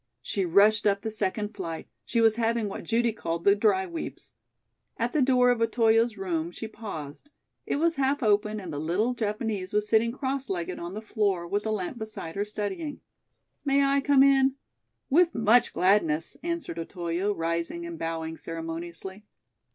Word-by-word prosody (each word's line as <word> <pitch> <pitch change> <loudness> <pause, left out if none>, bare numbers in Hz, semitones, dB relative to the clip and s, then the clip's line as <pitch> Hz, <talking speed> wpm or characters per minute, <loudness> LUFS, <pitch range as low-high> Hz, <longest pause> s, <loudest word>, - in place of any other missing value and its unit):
She 195 -3 -1
rushed 205 +4 +5
up 200 0 +1
the 220 - -2
second 210 0 -2
flight. 165 -5 -5 0.2
She 230 - +1
was 225 -1 +4
having 230 -1 +1
what 195 - -6
Judy 235 0 +1
called 170 -5 -3
"the 200 - +6
dry 200 -3 +2
weeps." 170 -2 -7 0.6
At 235 +1 -1
the 300 - +2
door 250 -1 +4
of 240 -2 0
Otoyo's 225 0 +3
room 170 -4 -2
she 220 +5 -7
paused. 205 - -8 0.4
It - - 0
was 330 +2 +1
half 275 0 +1
open 210 0 +2
and 180 -5 -7
the 145 - -3
little 185 +11 0
Japanese 210 -3 -3
was 210 0 +1
sitting 225 +2 +3
cross 270 +1 -3
legged 175 -3 -3
on 175 +3 -6
the 215 - -6
floor 200 -5 0
with 205 +4 -1
a - - 0
lamp 215 +4 -3
beside 215 -7 -6
her, 200 +3 -1
studying. 210 +8 -4 0.6
"May 280 0 +3
I 275 0 +2
come 275 -1 +5
in?" 270 -1 +4 0.6
"With 340 +3 +4
much 230 +1 +4
gladness," 170 -4 +2
answered 335 - -3
Otoyo, 175 +3 -2
rising 170 - -2
and 340 -1 -7
bowing 160 0 -3
ceremoniously. 165 +5 -7
210 Hz, 175 wpm, -27 LUFS, 180-240 Hz, 0.6 s, the